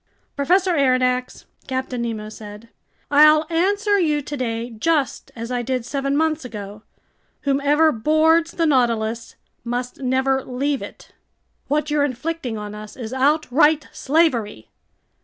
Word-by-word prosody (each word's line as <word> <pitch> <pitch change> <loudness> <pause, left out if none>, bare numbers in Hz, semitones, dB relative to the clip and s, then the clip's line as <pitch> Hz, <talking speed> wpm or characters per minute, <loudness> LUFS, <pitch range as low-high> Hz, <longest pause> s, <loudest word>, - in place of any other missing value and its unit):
"Professor 365 +6 +2
Aronnax," 255 -3 +1 0.2
Captain 260 -2 -3
Nemo 225 -3 -4
said, 215 +1 -11 0.4
"I'll 305 +2 +6
answer 405 +4 +2
you 300 -4 +1
today 240 -4 -4
just 280 +5 -1
as 230 +1 -6
I 245 -1 -1
did 250 -1 -2
seven 275 +1 -1
months 315 -1 0
ago: 210 -3 -8 0.6
whoever 290 +3 +3
boards 315 +6 +2
the 335 - 0
Nautilus 235 -5 0 0.3
must 245 +1 -4
never 265 0 +1
leave 275 +2 -2
it." - - -11 0.6
"What 300 +2 -1
you're 295 -1 +2
inflicting 265 -2 -3
on 210 0 -6
us 210 0 -10
is 240 -1 -6
outright 295 +2 +2
slavery!" 245 - 0
265 Hz, 125 wpm, -21 LUFS, 235-305 Hz, 0.6 s, I'll